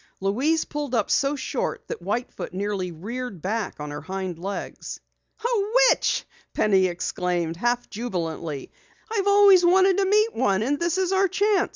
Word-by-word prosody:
Louise 265 +12 +1
pulled 290 -4 -3
up 215 -3 0
so 280 +1 +2
short 280 - -3
that - - -6
White 210 +7 -2
Foot - - -7
nearly 195 -2 -2
reared 215 +5 -6
back 205 +3 -3
on 150 0 -5
her 145 0 -6
hind 185 0 -5
legs. 195 +3 -6 0.5
"A 435 -4 0 0.2
witch!" - - 0 0.3
Penny 190 -3 +3
exclaimed, 175 -1 -2
half 240 +6 0
jubilantly. 165 - -4 0.4
"I've 405 -3 0
always 400 -2 +7
wanted 375 +2 +5
to 395 - +2
meet 425 +3 +3
one, 195 +1 +1
and 285 +5 0
this 345 +1 0
is 375 -1 +1
our 385 0 +3
chance!" 405 +2 +1
235 Hz, 165 wpm, -24 LUFS, -, 0.5 s, always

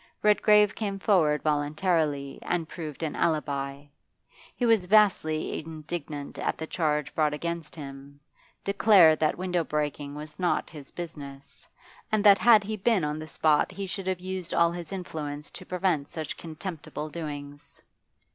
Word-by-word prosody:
Redgrave 210 0 +5
came 200 -3 -3
forward 165 -7 +2
voluntarily 150 -1 0
and 170 -2 -2
proved 155 -2 -7
an 155 - -2
alibi; 140 -4 -1 0.7
he 245 - 0
was 225 -5 +4
vastly 185 -7 +3
indignant 155 -2 -6
at - - -1
the 160 - -4
charge 150 -4 -1
brought 150 -2 +1
against 170 0 -5
him, 140 -1 -10 0.4
declared 195 -6 +6
that 155 -1 +1
window 180 -1 0
breaking 150 -2 -3
was 150 +1 -9
not 180 -1 0
his 145 -4 -10
business, 140 -5 -9 0.4
and 215 -2 +2
that 200 -2 +7
had 225 -3 +6
he 215 +2 -3
been 210 -2 +2
on 150 +1 -2
the 155 - -7
spot 155 +2 +2
he 195 +1 -5
should 190 0 -5
have 185 -1 -1
used 185 -1 -4
all 170 0 +4
his 170 -2 -7
influence 150 -6 -5
to - - -10
prevent 180 -6 0
such 160 -3 -5
contemptible 160 -2 -6
doings. 145 -3 -7
160 Hz, 150 wpm, -27 LUFS, 150-185 Hz, 0.7 s, that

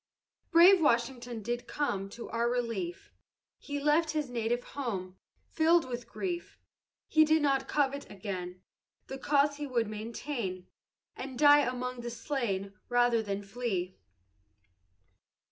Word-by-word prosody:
Brave 360 +2 +7
WASHINGTON 240 -4 0
did 240 +2 -3
come 200 -10 -2
To 235 +3 -8
our 235 +1 +1
relief; 345 - -3 0.5
He 285 0 -4
left 300 +3 +3
his 300 -5 -2
native 240 +1 -1
home, 195 -9 -5 0.3
Filled 325 -1 +3
with 240 -1 -5
grief, 350 -3 -4 0.5
He 315 - +5
did 310 0 +3
not 275 -2 +2
covet 280 -1 0
gain, 185 -2 -5 0.4
The 270 - -7
cause 285 +1 +2
he 295 -1 -4
would 235 -4 0
maintain 215 -3 -4 0.5
And 260 -1 -7
die 290 +1 +7
among 250 -2 -2
the 240 - -4
slain 230 -6 -3 0.2
Rather 245 -1 +3
than 205 -1 -4
flee. 195 -4 -3
245 Hz, 130 wpm, -30 LUFS, 225-290 Hz, 0.5 s, Brave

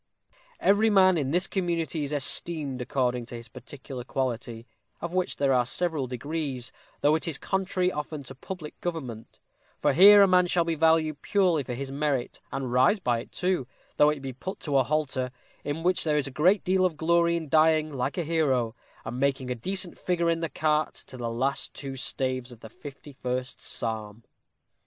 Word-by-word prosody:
Every 205 +3 +4
man 190 -3 +5
in 145 -5 0
this 175 +5 +2
community 170 -5 -1
is 140 - -4
esteemed 145 -1 0
according 125 -1 -1
to 120 - -8
his 115 0 -9
particular 130 +1 -9
quality, 120 -3 -3 0.3
of 170 - -5
which 185 0 0
there 140 -1 +2
are 125 -1 +4
several 155 +1 -1
degrees, 130 -1 -4 0.3
though 145 +1 +4
it 160 +2 0
is 155 -4 0
contrary 185 -1 0
often 150 -1 -5
to 135 - -9
public 155 +3 -8
government; 130 -11 -5 0.4
for 145 - +2
here 200 +5 +9
a - - +5
man 180 -1 +4
shall 175 -1 +2
be 165 0 -1
valued 160 -1 +2
purely 185 -6 +2
for 125 -2 -5
his 135 +1 -5
merit, 140 -3 -2
and 130 -3 -3
rise 130 - +4
by 120 -9 0
it - - -10
too, 180 -8 -1 0.3
though 150 - +6
it 150 -2 -2
be 135 -1 -5
but 185 +10 -7
to 145 -3 0
a 135 - +5
halter, 140 -3 -1 0.3
in 145 +3 -3
which 180 +1 +2
there 150 -2 +1
is 145 - +1
a 135 - -5
great 180 +9 +3
deal 185 0 +2
of 175 -4 +1
glory 170 +1 +3
in 160 -2 -5
dying 155 0 +3
like 130 +3 -2
a 175 - 0
hero, 140 -8 +1 0.3
and 120 +2 -5
making 135 -2 0
a - - +2
decent 185 +9 -3
figure 170 -2 +1
in 165 - 0
the 165 -1 -2
cart 155 0 0
to - - -11
the 120 -2 -3
last 130 +4 -2
two 135 -1 -6
staves 130 -1 -2
of 120 - -14
the 110 - -10
fifty 145 +4 -11
first 125 -1 -4
psalm." 110 -1 -4
145 Hz, 195 wpm, -27 LUFS, 130-170 Hz, 0.4 s, here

